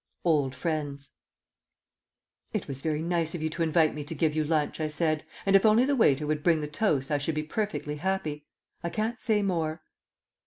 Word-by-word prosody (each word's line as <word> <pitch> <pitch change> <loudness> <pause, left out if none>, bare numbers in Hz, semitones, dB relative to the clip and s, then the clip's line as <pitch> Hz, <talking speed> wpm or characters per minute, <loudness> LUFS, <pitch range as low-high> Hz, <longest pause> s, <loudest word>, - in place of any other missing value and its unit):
OLD 145 -6 +2
FRIENDS 145 -3 -3 1.4
"It - - -2
was 135 -1 -4
very 155 0 -1
nice 170 -1 0
of 160 - -4
you 160 - -1
to 170 - -4
invite 160 -1 +3
me 150 - -5
to 165 +2 -4
give 155 0 +1
you 155 - +2
lunch," 155 0 0
I 155 - 0
said, 155 0 0 0.2
"and 195 0 +4
if 195 - +6
only 220 +3 +5
the 285 +1 +2
waiter 150 - +3
would 150 0 -1
bring 165 0 +3
the 150 - -3
toast 150 -4 0
I 145 - +2
should 150 +2 -1
be 155 - -1
perfectly 155 -4 -3
happy. 155 -4 -2 0.4
I 170 - -1
can't 220 +5 -2
say 215 -3 +2
more." 165 -4 -1
155 Hz, 200 wpm, -28 LUFS, 150-175 Hz, 1.4 s, if